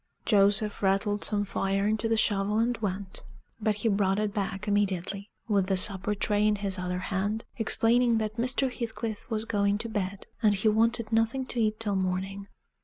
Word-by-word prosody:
Joseph 205 0 +2
rattled 200 +1 +1
some 205 -1 0
fire 195 0 -1
into 220 +1 0
the 225 - +2
shovel 205 -1 +1
and 235 +2 +1
went; 195 -2 -4 0.4
but 215 -1 +1
he 210 +3 -2
brought 195 -2 +2
it 210 -1 -1
back 200 0 -3
immediately, 200 -1 -1 0.2
with 200 -4 +1
the 190 -1 +1
supper 195 +2 +3
tray 210 +1 +1
in 210 - +3
his 200 -2 -3
other 180 0 -2 0.2
hand, 205 +4 -1
explaining 235 +1 +3
that 215 0 -3
Mr. 255 +2 +1
Heathcliff 225 -2 -5
was 220 -1 -1
going 205 -2 +1
to 230 +2 -5
bed, 200 -2 -3 0.2
and 210 -3 +4
he 200 +3 +2
wanted 230 +1 +2
nothing 225 +4 +1
to 245 - -4
eat 215 -1 +1
till 210 -3 0
morning. 190 +1 -2
210 Hz, 180 wpm, -28 LUFS, 195-225 Hz, 0.4 s, and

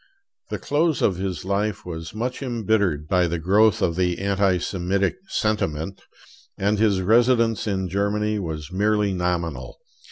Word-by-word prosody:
The - - -3
close 155 +1 0
of 95 - +2
his 95 -3 -4
life 100 +1 -1
was 80 +1 -7
much 125 +4 -3
embittered 105 - 0
by 90 0 +2
the 85 +1 -2
growth 100 +5 +3
of 85 - +1
the 90 -1 0
anti 100 -1 +1
Semitic 95 - -1
sentiment; 95 - -2 0.6
and 100 +1 +1
his 105 -4 +3
residence 115 +1 +3
in 95 -2 -1
Germany 105 +3 0
was 80 -3 -5
merely 105 +1 +1
nominal. 85 -8 -2
100 Hz, 140 wpm, -23 LUFS, 90-105 Hz, 0.6 s, growth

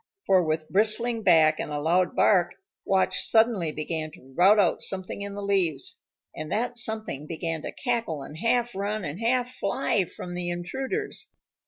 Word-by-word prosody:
For 190 -1 +4
with 155 -1 -2
bristling 225 +4 +2
back 160 -5 +4
and - - -3
a 145 - -2
loud 175 +4 +1
bark, 175 -4 +3 0.3
Watch 190 -1 +2
suddenly 220 -8 +3
began 155 +1 -3
to 130 +1 -16
rout 195 +5 +6
out 180 -4 +2
something 190 +1 -2
in 200 0 -5
the 205 - -5
leaves, 180 -8 0 0.3
and 155 - -6
that 240 +2 -1
something 215 - -3
began 165 -1 -3
to - - -5
cackle 230 - -2
and 150 - -10
half 240 +2 +1
run 200 0 -2
and 150 +5 -5
half 250 +2 +1
fly 200 -3 0
from 175 +1 -8
the 175 0 -2
intruders. 265 - -4
190 Hz, 170 wpm, -26 LUFS, 165-220 Hz, 0.3 s, rout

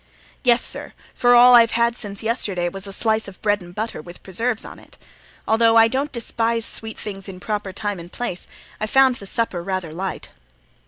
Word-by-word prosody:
"Yes, 245 -2 +4
sir; - - -7 0.2
for 245 0 +4
all 245 +1 +8
I've 230 -1 +7
had 235 0 +2
since 205 -2 -7
yesterday 200 -6 -1
was 195 +2 -8
a - - -7
slice 220 +2 0
of 195 - -11
bread 205 -1 +2
and 175 0 -12
butter, 220 -6 -4
with 175 +2 -13
preserves 225 +5 -2
on - - -10
it. - - -18 0.5
Although 225 +1 +4
I 225 0 +7
don't 275 +5 -2
despise 230 -1 -1
sweet 220 0 -4
things 195 -2 -6
in 185 -1 -9
proper 205 0 -3
time 205 0 -3
and 170 +1 -11
place, 240 -8 -5 0.3
I 215 - -2
found 260 +1 +4
the 200 - -10
supper 225 -6 -1
rather 185 -3 -4
light." 190 +3 -5
215 Hz, 200 wpm, -21 LUFS, 190-235 Hz, 0.5 s, all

